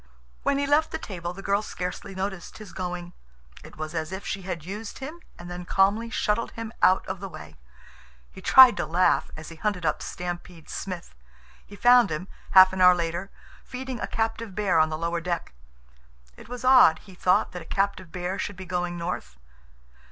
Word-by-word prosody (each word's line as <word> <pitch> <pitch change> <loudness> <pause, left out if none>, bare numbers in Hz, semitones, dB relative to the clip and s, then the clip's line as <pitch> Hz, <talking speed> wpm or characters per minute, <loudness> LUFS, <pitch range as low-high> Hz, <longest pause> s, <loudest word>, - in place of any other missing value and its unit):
When 280 - +1
he 285 - 0
left 295 +3 +3
the - - -3
table, 175 - -6
the 195 +2 -10
girl 200 +1 +1
scarcely 185 -1 -6
noticed 190 -2 -5
his 215 -4 -11
going. 180 -1 -5 0.5
It - - -13
was 155 +1 -5
as 160 0 -3
if 190 +1 -6
she 195 - -3
had 175 -4 -5
used 205 +3 -6
him 300 +6 -7 0.2
and 175 - -10
then 175 0 -6
calmly 200 +5 +2
shuttled 225 0 -1
him 230 0 -7
out 185 - +4
of 190 -1 -5
the 195 0 -6
way. 80 - -11 0.8
He - - -12
tried 255 -4 +8
to - - -2
laugh 180 +3 +2
as 155 - -9
he 165 - -11
hunted 190 -2 -2
up 155 - 0
Stampede 175 -2 -7
Smith. 185 -3 -6 0.5
He 205 - -13
found 245 -1 +6
him, 160 +4 -4 0.3
half 185 0 +9
an 190 - -2
hour 180 0 +8
later, 170 +2 -3 0.3
feeding 255 -1 -6
a - - -3
captive 225 -2 -2
bear 200 -5 +2
on 155 0 +4
the 155 - -3
lower 170 +1 -2
deck. 170 - -3 0.8
It - - -14
was 245 0 -6
odd, 255 -11 +7
he 190 - -15
thought, 180 0 +2
that 180 - -7
a - - -11
captive 195 -3 -1
bear 180 +1 -3
should 205 - -3
be 190 +1 -9
going 175 0 -2
north. 170 - -5
185 Hz, 195 wpm, -26 LUFS, 175-210 Hz, 0.8 s, half